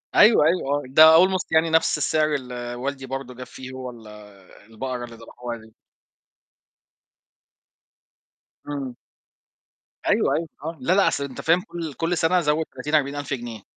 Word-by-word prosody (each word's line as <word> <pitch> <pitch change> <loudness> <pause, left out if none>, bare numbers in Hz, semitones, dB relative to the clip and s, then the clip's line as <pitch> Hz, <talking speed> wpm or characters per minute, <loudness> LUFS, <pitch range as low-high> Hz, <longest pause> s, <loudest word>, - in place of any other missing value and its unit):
أيوه، 210 -8 +7
أيوه 145 -4 +1
ده 150 +4 +7 0.2
almost 190 -1 -1
يعني 160 0 +3
نَفْس 160 0 +2
السعر 155 -1 +1
اللي 125 -2 -5
والدي 135 +2 -4
برضه 135 -1 -6
جاب 125 +1 -9
فيه 130 0 -10
هو 130 -1 -7
ال 115 -2 -14 0.6
البقرة 125 +2 -5
اللي 115 - -12
دبحوها 120 +1 -8
دي. 110 -1 -17 2.9
إمم. 135 -4 -5 1.1
أيوه، - - +2
أيوه، 165 +1 -2 0.2
آه، 165 +1 -5
لأ، 170 - +2
لأ، 200 +1 +4
أصل 140 - 0
أنت 130 -2 -7
فاهم 170 +3 +3
كل 170 -6 -7
كل 165 +4 -1
سنة 170 +3 +3
زوّد 150 +1 +1
30، 150 +4 -3
40000 145 -1 -1
جنيه. 120 -5 -6
140 Hz, 150 wpm, -23 LUFS, 125-160 Hz, 2.9 s, أيوه